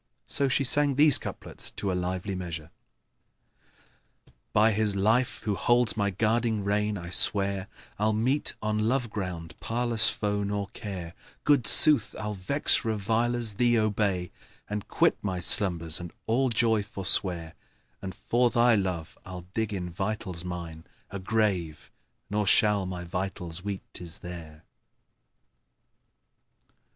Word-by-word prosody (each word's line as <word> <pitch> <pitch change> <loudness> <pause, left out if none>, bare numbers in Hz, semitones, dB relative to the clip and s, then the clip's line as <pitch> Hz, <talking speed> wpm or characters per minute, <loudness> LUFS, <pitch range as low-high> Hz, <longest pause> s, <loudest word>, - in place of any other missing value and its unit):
So 140 - +1
she 135 +2 +1
sang 145 +1 +3
these 145 -1 +5
couplets - - -6
to 100 - -2
a - - -1
lively 90 +2 -3
measure, 85 -4 -6 1.8
"By 110 +2 +4
His 105 -1 0
life 110 +6 +1
who 105 -2 -1
holds 120 +4 +2
my 100 -2 0
guiding 110 +2 0
rein, 105 +1 -1
I 85 -1 -8
swear 100 0 +2 0.2
* - - -27
I'll 105 +1 +2
meet 125 +7 0
on 110 +1 0
love 125 -3 -1
ground 90 -5 -5
parlous 120 -1 +2
foe 105 -1 -2
nor 100 -1 -3
care: 95 -6 -7 0.3
Good 140 -7 +3
sooth 150 -8 +6
I'll 105 0 -4
vex 105 +13 +1
revilers, 115 +1 0
thee 120 +3 +2
obey 100 -4 -1 0.2
* - - -30
And 105 0 -5
quit - - +1
my 95 -3 -3
slumbers 85 -3 +3
and 90 -1 -8
all 130 +4 +1
joy 115 -2 +2
forswear: 95 -4 +1 0.5
And 95 -2 -7
for 120 +1 +1
thy 120 0 +3
love 90 -6 -3
I'll 90 -1 -9
dig 110 -1 -2
in 90 -3 -4
vitals 95 -1 -4
mine 85 -3 -7 0.2
* - - -35
A 100 - -5
grave, 95 -6 -2 0.4
nor 105 0 -2
shall 105 -1 +3
my 90 -1 -6
vitals 90 -1 -5
weet 100 -2 -5
'tis 85 -2 -3
there!" 80 -3 -9
100 Hz, 140 wpm, -27 LUFS, 90-110 Hz, 1.8 s, sooth